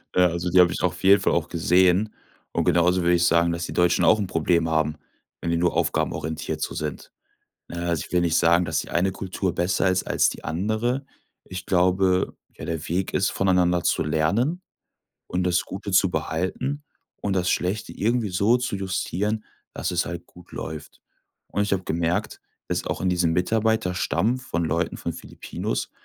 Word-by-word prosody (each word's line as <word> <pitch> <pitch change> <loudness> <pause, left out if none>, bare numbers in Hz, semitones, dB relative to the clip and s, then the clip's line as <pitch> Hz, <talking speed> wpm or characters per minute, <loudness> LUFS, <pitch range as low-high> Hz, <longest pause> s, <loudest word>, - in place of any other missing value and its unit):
Äh, 90 - +5
also, 85 0 +1
die 90 - +4
habe 90 -1 +4
ich - - -4
auf 90 -1 -1
jeden 100 +1 +6
Fall - - +2
auch 85 0 0
gesehen 90 +4 +3 0.4
und - - +1
genauso 90 +1 +3
würde 85 0 +3
ich 85 0 +2
sagen, 85 0 +3
dass 85 0 -3
die - - -6
Deutschen 90 0 +3
auch 110 - +5
'n 105 - 0
Problem 80 -1 +1
haben, 80 -1 +1 0.5
wenn 85 - -1
die 85 - +1
nur 85 0 +1
aufgabenorientiert 80 +1 -1
so - - -2
sind. - - -5 0.6
Ne, 85 0 -4
also, 85 -3 0
ich - - -17
will 90 - +3
nicht 85 -1 +2
sagen, 85 +1 +4
dass 80 -3 -1
die - - -8
eine 90 +3 +1
Kultur 95 -1 -3
besser 90 +1 +1
ist 95 0 0
als - - +2
die - - -10
andere. 110 - -1 0.4
Ich 90 -1 -7
glaube, 90 0 +2 0.2
ja, - - -8
der 80 -1 -4
Weg 90 +3 -1
ist, 95 - +2
voneinander 90 -2 +2
zu - - +1
lernen 100 - 0 0.7
und 90 0 -1
das 90 -1 +1
Gute 100 +1 -6
zu 95 0 +4
behalten 95 - -2 0.4
und 100 -2 -1
das 90 -1 +1
Schlechte 95 +5 -1
irgendwie 115 0 0
so 100 +7 +3
zu 125 -3 -3
justieren, 100 +3 -2 0.3
dass 90 - -2
es 90 0 0
halt 85 0 -6
gut 90 0 -17
läuft. 80 -1 -7 0.5
Und 105 - 0
ich 100 - -2
habe 95 -1 -4
gemerkt, 85 +1 -1 0.3
dass - - -1
auch - - -3
in 95 - +2
diesem 85 -2 +2
Mitarbeiterstamm 110 +3 +1
von 85 -10 -3
Leuten 80 +2 -1
von - - -4
Philippinos - - -5
90 Hz, 190 wpm, -24 LUFS, 85-95 Hz, 0.7 s, jeden